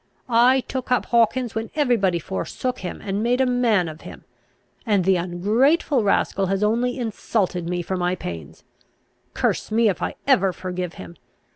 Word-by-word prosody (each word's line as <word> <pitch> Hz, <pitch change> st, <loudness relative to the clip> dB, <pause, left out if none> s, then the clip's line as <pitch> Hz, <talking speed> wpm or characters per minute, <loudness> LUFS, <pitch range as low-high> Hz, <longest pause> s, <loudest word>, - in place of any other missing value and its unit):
I 255 Hz, +2 st, +5 dB
took 255 Hz, 0 st, -6 dB
up 250 Hz, -, +2 dB
Hawkins 235 Hz, +1 st, +2 dB
when 225 Hz, 0 st, -3 dB
every 285 Hz, -5 st, +3 dB
body 190 Hz, -5 st, +1 dB
forsook 220 Hz, +8 st, -4 dB
him, 180 Hz, -, -6 dB
and 200 Hz, 0 st, -2 dB
made 245 Hz, +3 st, +1 dB
a 265 Hz, -, +4 dB
man 240 Hz, -8 st, +2 dB
of 155 Hz, 0 st, -9 dB
him; -, -, -11 dB, 0.6 s
and 205 Hz, -7 st, +1 dB
the 190 Hz, 0 st, +4 dB
ungrateful 220 Hz, -, +1 dB
rascal 195 Hz, -1 st, +1 dB
has 195 Hz, +2 st, 0 dB
only 240 Hz, +4 st, +1 dB
insulted 200 Hz, -6 st, -2 dB
me 175 Hz, 0 st, -2 dB
for 190 Hz, -, -3 dB
my 180 Hz, 0 st, 0 dB
pains. 85 Hz, -, -8 dB, 0.7 s
Curse -, -, 0 dB
me, 225 Hz, 0 st, +3 dB
if 190 Hz, -, -3 dB
I -, -, -2 dB
ever 195 Hz, -9 st, +3 dB
forgive 180 Hz, -1 st, -5 dB
him! 85 Hz, -2 st, -10 dB
210 Hz, 170 wpm, -22 LUFS, 180-245 Hz, 0.7 s, I